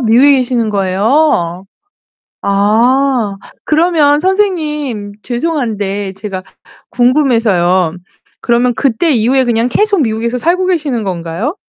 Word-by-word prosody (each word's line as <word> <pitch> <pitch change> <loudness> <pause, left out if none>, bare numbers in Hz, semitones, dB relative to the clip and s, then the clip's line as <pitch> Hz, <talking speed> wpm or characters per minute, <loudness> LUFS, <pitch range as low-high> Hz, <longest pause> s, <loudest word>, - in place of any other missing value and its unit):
미국에 255 +4 +4
계시는 240 -4 -1
거예요? 195 - 0 0.8
아 220 +2 +1 0.3
그러면 305 -2 +2
선생님 300 - -1
죄송한데 220 -8 -3
제가 195 -1 -6 0.5
궁금해서요. 225 - +2 0.5
그러면 240 +1 +1
그때 270 +7 +1
이후에 255 +2 +2
그냥 235 0 0
계속 405 - +1
미국에서 230 +1 -2
살고 355 +7 0
계시는 295 - -1
건가요? 180 - -4
240 Hz, 260 characters per minute, -13 LUFS, 205-290 Hz, 0.8 s, 미국에